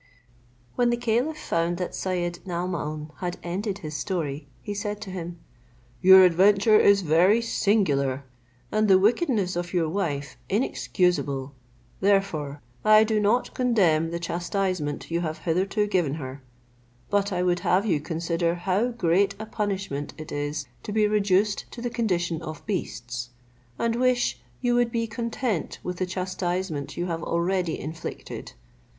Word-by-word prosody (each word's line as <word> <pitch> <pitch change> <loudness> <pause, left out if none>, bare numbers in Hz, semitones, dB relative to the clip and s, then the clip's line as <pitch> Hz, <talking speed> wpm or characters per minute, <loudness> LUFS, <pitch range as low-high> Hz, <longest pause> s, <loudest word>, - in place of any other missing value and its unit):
When 245 -1 +2
the 240 - +1
caliph 240 +6 0
found 170 - -1
that 180 -1 -3
Syed 175 -2 -2
Naomaun 170 -4 -3
had 180 -1 -3
ended 195 +3 -2
his 155 - -5
story, 150 -6 -3 0.2
he 205 - -4
said 205 0 -3
to 200 -3 -6
him, 175 -2 -6 0.6
"Your 190 +1 +9
adventure 200 +4 +5
is 200 -1 +5
very 175 +7 +4
singular, 150 - +1 0.5
and 215 0 +2
the 190 -2 +7
wickedness 210 - +2
of 175 +1 -3
your 165 -2 +2
wife 150 -6 -2
inexcusable; 180 - 0 0.5
therefore 180 -8 +1 0.2
I 215 0 +7
do 220 -1 +1
not 215 +4 +1
condemn 185 -11 +2
the 170 - -3
chastisement 175 -2 -2
you 170 +1 0
have 160 -2 -3
hitherto 190 +5 0
given 175 -8 +1
her; 135 -2 -7 0.7
but 205 0 +2
I 180 -1 0
would 175 -1 +2
have 190 +4 +2
you 175 -8 +2
consider 170 +2 -1
how 190 +6 +1
great 200 -4 +1
a 220 - -6
punishment 195 -9 -3
it 155 - -8
is 145 0 -3 0.2
to - - -6
be 215 0 +3
reduced 205 -1 +1
to - - -8
the 240 0 -3
condition 175 -8 0
of 155 -2 -8
beasts, 125 - -4 0.5
and 230 0 0
wish 245 - +1 0.2
you 245 -1 +2
would 240 -1 +2
be 230 0 0
content 230 - -2
with 180 -1 -4
the 185 - -1
chastisement 180 -4 -3
you 175 - -1
have 165 -2 -3
already 170 0 0
inflicted. 160 +2 -7
185 Hz, 150 wpm, -26 LUFS, 165-210 Hz, 0.7 s, Your